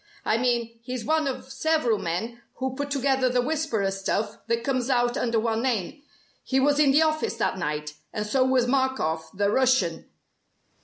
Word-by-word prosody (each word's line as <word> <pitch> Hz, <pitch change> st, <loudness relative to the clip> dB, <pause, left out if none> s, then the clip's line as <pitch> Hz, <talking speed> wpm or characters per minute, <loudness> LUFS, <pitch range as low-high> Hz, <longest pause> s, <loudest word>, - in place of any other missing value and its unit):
I 220 Hz, -, +2 dB
mean 235 Hz, -2 st, 0 dB
he's 250 Hz, 0 st, -5 dB
one 315 Hz, -1 st, +1 dB
of 265 Hz, 0 st, -5 dB
several 270 Hz, -7 st, +1 dB
men 225 Hz, +8 st, -3 dB
who 260 Hz, 0 st, -3 dB
put 285 Hz, +1 st, -3 dB
together 270 Hz, -2 st, +1 dB
the 250 Hz, 0 st, +1 dB
'Whisperer' 250 Hz, -9 st, 0 dB
stuff 195 Hz, +2 st, -2 dB
that 230 Hz, 0 st, 0 dB
comes 255 Hz, -1 st, -1 dB
out 245 Hz, -2 st, +2 dB
under 230 Hz, -2 st, +1 dB
one 225 Hz, 0 st, 0 dB
name. 245 Hz, -, -2 dB, 0.4 s
He 265 Hz, -, +1 dB
was 290 Hz, +2 st, +3 dB
in 295 Hz, -2 st, +5 dB
the 295 Hz, +4 st, +5 dB
office 310 Hz, -5 st, 0 dB
that 225 Hz, -4 st, -1 dB
night, 150 Hz, -2 st, -3 dB, 0.2 s
and 210 Hz, -1 st, -3 dB
so 255 Hz, +5 st, +2 dB
was 260 Hz, -1 st, +3 dB
Markoff 245 Hz, -, 0 dB
the 200 Hz, +1 st, 0 dB
Russian! 245 Hz, -10 st, +1 dB
245 Hz, 175 wpm, -25 LUFS, 220-270 Hz, 0.4 s, in